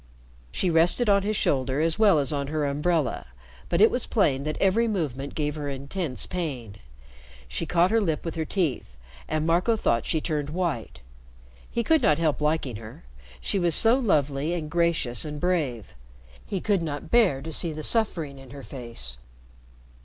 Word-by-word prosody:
She 180 - 0
rested 175 +8 +4
on 200 0 +5
his 210 +1 -1
shoulder 130 0 0
as 165 +5 +2
well 205 -6 +5
as 145 0 +2
on 140 -1 -2
her 150 0 -1
umbrella, 150 - 0 0.4
but 170 - +1
it 220 - +7
was 250 - -1
plain 140 - +1
that 155 - -2
every 210 +5 +3
movement 145 - -3
gave 150 -1 -1
her 145 -2 -4
intense 140 +1 -4
pain. 135 - -5 0.7
She 160 - -3
caught 175 +3 +3
her 225 0 +3
lip 160 -6 -1
with 165 - -3
her 160 - -2
teeth, 150 - -2 0.3
and 155 0 -1
Marco 180 +8 +2
thought 115 - 0
she 160 - +1
turned 150 -2 -2
white. 160 - -3 0.7
He 235 - -1
could 320 +4 +3
not 150 - +3
help 155 -3 0
liking 150 -6 0
her. 110 - -11 0.4
She 200 - -1
was 170 -3 +2
so 225 +2 +6
lovely 150 - +1
and 155 -3 -5
gracious 170 -9 +1
and 150 -1 -5
brave. 150 - -1 0.5
He 195 -3 -3
could 200 -4 +1
not 155 -1 -5
bear 210 - +4
to 160 0 -5
see 170 - +2
the 155 0 -6
suffering 165 - 0
in 135 -1 -13
her 140 +1 -10
face. 115 - -6
155 Hz, 180 wpm, -26 LUFS, 140-180 Hz, 0.7 s, it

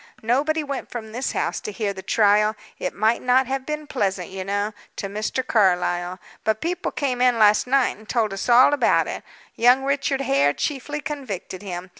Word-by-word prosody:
Nobody 295 +7 +1
went 280 -2 -5
from 220 -3 -7
this 250 +4 -3
house - - -1
to 210 - -5
hear 205 -1 -2
the 190 - -8
trial 210 +1 +3 0.2
it 180 - -3
might 220 +3 +2
not 255 +1 +3
have 265 +1 -4
been 300 0 -3
pleasant, 195 -10 -2
you 190 0 -5
know, 205 +2 -2 0.2
to - - -5
Mr. 215 +6 -3
Carlyle; 180 -4 +1 0.3
but 220 0 0
people 355 +4 -2
came 255 -4 -2
in 250 -2 +4
last 215 +1 +4
night 270 0 +2
and 215 0 -17
told 220 -4 0
us 195 +5 -4
all 250 +4 +7
about 290 - +3
it. - - -5 0.3
Young 250 +3 +4
Richard 275 0 0
Hare 140 - +2
chiefly 295 - -3
convicted 235 - -6
him. 180 -2 -6
225 Hz, 190 wpm, -23 LUFS, 200-270 Hz, 0.3 s, all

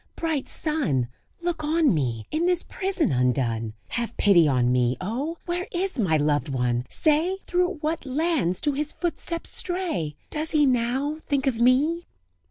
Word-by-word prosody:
bright 320 -5 -2
sun! 225 - +1 0.4
Look 340 -3 -2
on 310 - +3
me, 120 -8 -1
in 330 +3 +1
this 360 -1 +3
prison 380 - -1
undone! 120 -3 0 0.2
Have 235 0 -3
pity 175 -6 +5
on 125 -3 +2
me! 125 0 +2
Oh! 265 - -3
where 355 +1 -2
is 365 -4 -2
my 170 -8 +3
loved 145 -1 +1
one? 125 -2 -1
say! 320 +5 +2
Through 360 +1 +1
what 315 +1 -2
lands 275 - 0
do 295 - +1
his 295 +2 -2
footsteps 335 -1 -3
stray? 335 - -1
And - - -38
does 310 +1 -2
he 300 -2 +3
now 260 +4 +1
think 280 -3 -1
of 240 -4 0
me?" 290 +8 +3
275 Hz, 165 wpm, -25 LUFS, -, 0.4 s, pity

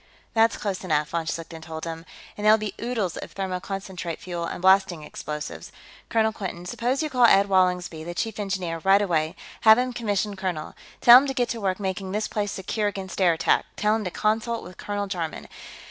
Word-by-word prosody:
"That's 225 -1 +3
close 195 -3 -3
enough," 150 -4 0
von 165 -1 -2
Schlichten 165 0 -5
told 160 0 -7
him. 165 0 -6 0.3
"And 205 - -7
there'll 215 +1 +7
be 215 -2 -4
oodles 225 -7 -2
of - - -8
thermoconcentrate 190 -2 -4
fuel, 175 -6 -5
and - - -5
blasting 190 -3 +3
explosives. 150 0 -6 0.4
Colonel 220 -1 +2
Quinton, 180 -4 -6
suppose 245 - -1
you 310 - -2
call 250 -2 +5
Ed 200 -3 +6
Wallingsby, 180 -4 +1
the 175 +1 -6
Chief 220 0 -3
Engineer, 190 -5 -2
right 195 +1 +6
away; 160 -5 0 0.3
have 220 0 +8
him 250 0 0
commissioned 205 -3 -2
colonel. 180 -5 -3 0.3
Tell 240 +1 +10
him 280 - -2
to 270 - -3
get 245 -2 +1
to 230 - -3
work 190 -1 -1
making 190 -1 -3
this 215 +1 -1
place 205 -1 -2
secure 205 +2 -2
against 195 -1 -5
air 175 -2 +5
attack; 160 - +1
tell 210 +1 +2
him 220 - -2
to 185 - -2
consult 220 +4 -1
with 180 - -11
Colonel 205 0 -3
Jarman. 175 -5 -4
195 Hz, 200 wpm, -25 LUFS, 175-215 Hz, 0.4 s, Tell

